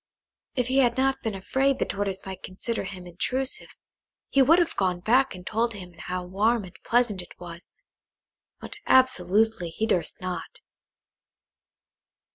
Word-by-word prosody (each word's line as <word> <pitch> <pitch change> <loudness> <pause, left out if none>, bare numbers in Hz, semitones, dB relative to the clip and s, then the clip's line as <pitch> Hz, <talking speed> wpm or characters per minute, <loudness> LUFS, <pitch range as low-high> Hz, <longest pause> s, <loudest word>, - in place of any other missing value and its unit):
If 250 - +1
he 260 +3 +2
had 245 -2 +3
not 270 0 +2
been 220 -4 -2
afraid 265 +8 +1
the - - 0
Tortoise 195 -1 -3
might 190 -1 -7
consider 225 +5 -3
him 185 -3 -8
intrusive, 255 +10 -2 0.6
he 275 - +4
would 310 +6 +6
have 345 -2 +1
gone 185 -2 +1
back 245 +5 +3
and 180 0 -11
told 230 +3 0
him 180 -3 -9
how 180 +2 -4
warm 210 +5 +1
and 185 -1 -11
pleasant 235 -5 +2
it 175 - -14
was, 170 0 -9 0.9
but - - -5
absolutely 220 -6 +3
he 215 +7 -2
durst 180 -6 0
not. 185 -1 -5
205 Hz, 150 wpm, -26 LUFS, 180-250 Hz, 0.9 s, would